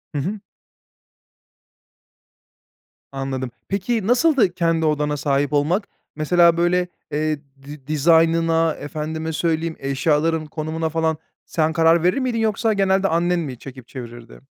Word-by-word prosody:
Hı -, -, 0 dB
hı. 200 Hz, +7 st, -3 dB, 2.7 s
Anladım, 135 Hz, -2 st, -4 dB, 0.2 s
peki, 205 Hz, +2 st, -1 dB
nasıldı 245 Hz, -, +3 dB
kendi 165 Hz, -2 st, +1 dB
odana 150 Hz, -1 st, 0 dB
sahip 140 Hz, 0 st, 0 dB
olmak? 175 Hz, +8 st, +1 dB, 0.3 s
Mesela, 170 Hz, +2 st, +4 dB
böyle, 180 Hz, +1 st, +2 dB, 0.2 s
eee, 155 Hz, 0 st, -1 dB, 0.2 s
di 145 Hz, -1 st, -11 dB
dizaynına, 165 Hz, +1 st, +3 dB
efendime 160 Hz, +2 st, -5 dB
söyleyeyim, 165 Hz, 0 st, -1 dB
eşyaların 155 Hz, +3 st, 0 dB
konumuna 160 Hz, +1 st, -3 dB
falan 160 Hz, -1 st, 0 dB, 0.3 s
sen 160 Hz, -1 st, 0 dB
karar 165 Hz, 0 st, +4 dB
verir 180 Hz, +8 st, +2 dB
miydin 250 Hz, -4 st, -1 dB
yoksa 220 Hz, 0 st, +1 dB
genelde 195 Hz, -1 st, +2 dB
annen 175 Hz, +1 st, +1 dB
mi 135 Hz, -7 st, -5 dB
çekip 130 Hz, -3 st, -11 dB
çevirirdi? 120 Hz, -, -10 dB
160 Hz, 120 wpm, -21 LUFS, 150-175 Hz, 2.7 s, Mesela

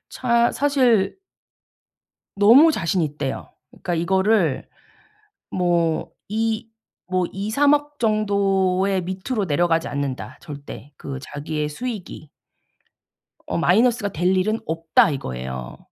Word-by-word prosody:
차 235 Hz, -1 st, +2 dB
사실 250 Hz, -9 st, +2 dB, 1.2 s
너무 240 Hz, +11 st, +7 dB
자신있대요. 155 Hz, -, -2 dB, 0.2 s
그러니까 175 Hz, -, -4 dB
이거를 190 Hz, -1 st, +1 dB, 0.8 s
뭐 170 Hz, -3 st, 0 dB, 0.2 s
이 220 Hz, +1 st, -1 dB, 0.5 s
뭐 185 Hz, -1 st, +1 dB
"2-3 220 Hz, +9 st, +2 dB
억 290 Hz, 0 st, -3 dB
정도의 195 Hz, -3 st, +1 dB
밑으로 190 Hz, +5 st, -3 dB
내려가지 165 Hz, 0 st, +1 dB
않는다 140 Hz, -2 st, -4 dB
절대." 145 Hz, -1 st, -10 dB
그 135 Hz, -1 st, -6 dB
자기의 150 Hz, +1 st, -4 dB
수익이. 180 Hz, -, -7 dB, 1.2 s
어 -, -, -2 dB
"마이너스가 220 Hz, +4 st, +2 dB
될 180 Hz, +4 st, +1 dB
일은 215 Hz, +4 st, +1 dB
없다." 165 Hz, 0 st, +2 dB
이거예요. 65 Hz, -, -6 dB
185 Hz, 220 characters per minute, -22 LUFS, 160-220 Hz, 1.2 s, 너무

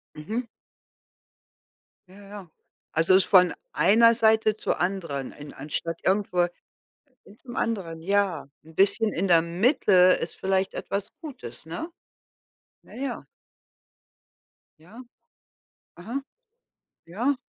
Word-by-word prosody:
Mhm. 215 Hz, +12 st, -4 dB, 1.6 s
Ja, 195 Hz, +2 st, -15 dB
ja. 200 Hz, -4 st, -10 dB, 0.4 s
Also, 165 Hz, +4 st, +3 dB
ist 190 Hz, -, +5 dB
von 180 Hz, -2 st, +5 dB, 0.2 s
einer 230 Hz, +3 st, +5 dB
Seite 220 Hz, -1 st, +3 dB
zur -, -, -2 dB
anderen, 170 Hz, -8 st, -2 dB
en 145 Hz, 0 st, -11 dB
anstatt 155 Hz, +4 st, -4 dB
irgendwo 190 Hz, -3 st, +2 dB, 0.8 s
hin 210 Hz, -, -18 dB
zum 240 Hz, -2 st, -11 dB
anderen, 180 Hz, -8 st, -2 dB
ja. 195 Hz, -2 st, 0 dB, 0.2 s
'N 160 Hz, +1 st, -16 dB
bisschen 205 Hz, +4 st, +2 dB
in 190 Hz, +3 st, -1 dB
der 165 Hz, -2 st, +5 dB
Mitte 195 Hz, -, +1 dB
ist 185 Hz, 0 st, +4 dB
vielleicht 190 Hz, 0 st, 0 dB
etwas 200 Hz, 0 st, -4 dB
Gutes, 270 Hz, -, -9 dB
ne? 175 Hz, -, -6 dB, 0.9 s
Ja, -, -, -17 dB
ja. 260 Hz, -1 st, -5 dB, 1.6 s
Ja. 210 Hz, +11 st, -13 dB, 0.9 s
Aha. 235 Hz, +10 st, -5 dB, 0.9 s
Ja. 240 Hz, +11 st, -1 dB
195 Hz, 110 wpm, -25 LUFS, 170-220 Hz, 1.6 s, ist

